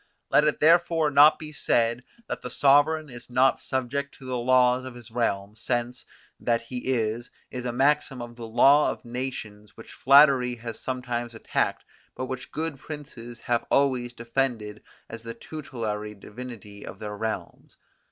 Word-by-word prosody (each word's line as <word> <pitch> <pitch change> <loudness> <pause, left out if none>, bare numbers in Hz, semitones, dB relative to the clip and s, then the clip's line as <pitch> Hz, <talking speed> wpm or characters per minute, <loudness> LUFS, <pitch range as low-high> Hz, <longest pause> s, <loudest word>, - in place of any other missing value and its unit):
"Let 150 - +5
it 150 - +1
therefore 165 -1 +4
not 145 +2 +7
be 155 -1 -8
said 120 -4 +1 0.2
that - - -4
the 125 - -6
sovereign 145 +4 +4
is 120 -3 -10
not 130 +2 +3
subject 135 +2 -3
to 135 - -14
the 130 0 -3
laws 125 +1 +3
of 130 -1 -8
his 120 -2 -12
realm, 105 -4 -1
since, 120 +2 -3 0.3
that 115 -1 0
he 125 +2 -5
is, 115 0 -1 0.2
is 125 -1 -5
a 120 - -1
maxim 135 +1 +1
of 120 0 -8
the 115 -1 -8
law 135 +6 +5
of - - -6
nations 115 -4 -6
which 115 - -12
flattery 135 -3 +5
has 115 -1 -7
sometimes 120 -2 -4
attacked, 115 - -1 0.3
but 130 - -3
which 130 +1 -6
good 155 -3 -4
princes 120 -6 -9
have 120 -1 -1
always 130 -3 +2
defended 115 -3 -2 0.3
as 115 0 -8
the 115 0 -7
tutelary 110 -8 -5
divinity 105 -1 -10
of - - -9
their 105 -1 -6
realms. 110 +1 -5
125 Hz, 160 wpm, -26 LUFS, 115-135 Hz, 0.3 s, not